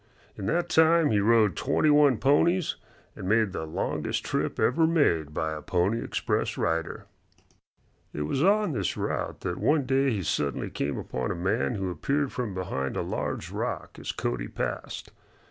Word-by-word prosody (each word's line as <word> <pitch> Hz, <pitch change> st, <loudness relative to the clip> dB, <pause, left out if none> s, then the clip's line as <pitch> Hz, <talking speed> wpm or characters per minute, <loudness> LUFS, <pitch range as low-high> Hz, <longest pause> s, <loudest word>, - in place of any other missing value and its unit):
In 100 Hz, -, -5 dB
that 175 Hz, 0 st, +1 dB
time 160 Hz, -2 st, +4 dB
he 105 Hz, -, +3 dB
rode 105 Hz, -3 st, +4 dB
twenty 145 Hz, -, +2 dB
one 145 Hz, -4 st, +5 dB
ponies 160 Hz, +7 st, +2 dB, 0.4 s
and 95 Hz, -, -5 dB
made 110 Hz, -1 st, +3 dB
the 80 Hz, -3 st, -4 dB
longest 80 Hz, -, -2 dB
trip -, -, -2 dB
ever 160 Hz, +6 st, +3 dB
made 85 Hz, -, +2 dB
by 80 Hz, +1 st, -2 dB
a 75 Hz, -, -6 dB
Pony 95 Hz, +8 st, 0 dB
Express -, -, -1 dB
rider. 80 Hz, 0 st, -1 dB, 1.1 s
It 75 Hz, -, -3 dB
was 130 Hz, -, -1 dB
while 205 Hz, +5 st, +4 dB
on 180 Hz, -, -1 dB
this 130 Hz, -, -2 dB
route -, -, -3 dB
that 90 Hz, -, -3 dB
one 150 Hz, -2 st, +2 dB
day 135 Hz, +2 st, +2 dB
he 105 Hz, -6 st, -1 dB
suddenly 70 Hz, -4 st, -1 dB
came 70 Hz, 0 st, -2 dB
upon 65 Hz, -, -3 dB
a -, -, -2 dB
man 100 Hz, +7 st, 0 dB
who 95 Hz, -2 st, -2 dB
appeared 140 Hz, +8 st, -1 dB
from 115 Hz, -7 st, -4 dB
behind 70 Hz, -7 st, -3 dB
a -, -, 0 dB
large -, -, -3 dB
rock -, -, -4 dB
as -, -, -3 dB
Cody -, -, -3 dB
passed. -, -, -5 dB
115 Hz, 175 wpm, -27 LUFS, -, 1.1 s, one